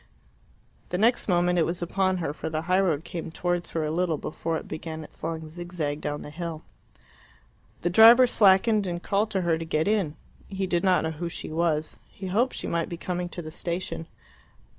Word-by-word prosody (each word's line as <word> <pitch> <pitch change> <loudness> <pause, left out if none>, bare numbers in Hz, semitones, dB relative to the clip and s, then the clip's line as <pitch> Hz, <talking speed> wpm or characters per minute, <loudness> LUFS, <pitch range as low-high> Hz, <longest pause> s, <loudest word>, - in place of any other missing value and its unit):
The 180 - -1
next 230 +5 +2
moment 175 -1 +2
it 165 - +3
was 170 +1 -3
upon 185 +1 +1
her, 160 -5 -2
for 160 - -5
the 155 0 -2
highroad 180 -4 +2
came 170 -1 -6
towards 175 +1 -2
her 160 -2 -2
a 150 - -2
little 170 -1 0
before 160 +2 -3
it - - -8
began 160 0 -6
its - - -14
long 160 -1 -3
zigzag 160 -3 -4
down 145 0 -3
the 150 - -9
hill. 165 0 -5 1.2
The 175 - 0
driver 230 +6 +9
slackened, 210 -1 +4
and 175 0 -4
called 205 +2 +1
to 195 -3 -1
her 165 -2 +1
to - - -3
get 160 +1 0
in. 200 -8 +1 0.3
He 195 -1 -2
did 175 -2 0
not 185 -2 +3
know 160 - -1
who 170 +2 -4
she 165 - -6
was. 160 -1 0
He 195 - -9
hoped 225 +8 +1
she - - -4
might 170 -1 -1
be 170 - -5
coming 180 0 -3
to 175 - -7
the 155 - -7
station. 170 0 -4
175 Hz, 205 wpm, -26 LUFS, 160-185 Hz, 1.2 s, driver